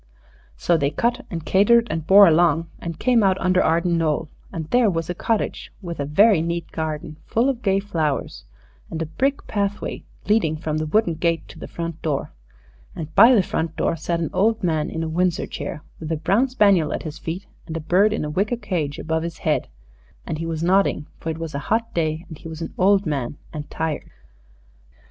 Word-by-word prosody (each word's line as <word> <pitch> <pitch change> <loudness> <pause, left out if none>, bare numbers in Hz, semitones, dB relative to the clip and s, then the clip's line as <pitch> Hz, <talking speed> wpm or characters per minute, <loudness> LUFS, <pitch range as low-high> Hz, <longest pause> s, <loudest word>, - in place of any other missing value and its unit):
So 170 - +2
they 140 -2 +1
cut 240 - -1
and 165 -3 -5
catered 230 +5 +4
and 160 -1 -3
bore 200 +1 +9
along, 165 0 +3
and 170 -2 -5
came 245 +2 +3
out 190 -2 +3
under 185 0 +3
Arden 170 +1 +2
Knoll, 155 -1 0 0.2
and 160 -2 -5
there 245 -3 +4
was 165 -2 -2
a - - -2
cottage, 220 +5 -2
with 170 -5 -7
a 140 - -1
very 190 +5 +5
neat 170 0 -3
garden 155 -1 -4
full 235 +4 +2
of 260 -3 -1
gay 195 -3 +2
flowers, 160 - -2 0.5
and 160 - -5
a 165 - -1
brick 270 - -1
pathway 205 -1 -2 0.2
leading 200 -7 +2
from 155 -1 -2
the 155 - -2
wooden 175 +1 +2
gate 165 +1 -1
to - - -12
the - - -7
front 170 -1 -5
door. 150 -4 -2 0.6
And 160 -1 -6
by 230 +8 +8
the 200 - +4
front 160 -2 -2
door - - 0
sat 170 +1 -2
an 165 - -2
old 215 +3 +2
man 160 -2 0
in 160 - -3
a - - -2
Windsor 175 +1 0
chair, 150 - -6 0.2
with 160 0 -5
a 160 - 0
brown 205 - +2
spaniel 200 - +3
at - - -4
his 155 -1 -7
feet 175 +5 -5 0.2
and 165 -1 -4
a - - -3
bird 185 +7 +3
in 215 - -1
a - - -3
wicker 205 +8 0
cage 175 -10 -2
above 160 0 -1
his 170 0 -5
head, - - +1 0.6
and 155 - -4
he 165 - -3
was 165 -1 -3
nodding, 185 -4 +2
for 165 - -4
it 160 - -3
was 165 -1 -5
a 140 - -2
hot 230 +1 0
day, 160 0 -1
and 160 -4 -10
he - - -9
was 160 0 -6
an - - -7
old 195 +1 +4
man 145 -3 -2 0.2
and 150 -2 -6
tired. 160 -2 -3
165 Hz, 215 wpm, -22 LUFS, 160-200 Hz, 0.6 s, bore